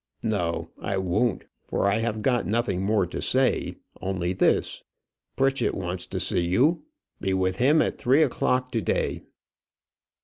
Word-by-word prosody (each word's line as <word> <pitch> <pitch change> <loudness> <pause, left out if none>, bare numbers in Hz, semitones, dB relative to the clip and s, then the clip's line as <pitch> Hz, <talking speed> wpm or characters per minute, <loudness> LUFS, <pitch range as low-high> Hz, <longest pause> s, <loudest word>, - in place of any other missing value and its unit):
"No, 90 -7 -1
I 100 0 -2
won't, 95 +3 0 0.2
for - - -1
I 100 +2 +2
have 110 -2 -2
got 125 -1 +1
nothing 105 -4 0
more 100 -1 +2
to 90 - -6
say; 130 -1 +1 0.3
only 95 -2 -2
this: 95 - +1 0.5
Pritchett 135 0 +1
wants 90 -1 -3
to - - -4
see - - +2
you. 130 - +2 0.3
Be 95 0 0
with 95 0 0
him 145 +6 +4
at - - -3
three 135 +5 +4
o'clock 130 -2 0
to 115 - 0
day." - - -1
105 Hz, 150 wpm, -25 LUFS, 95-125 Hz, 0.5 s, him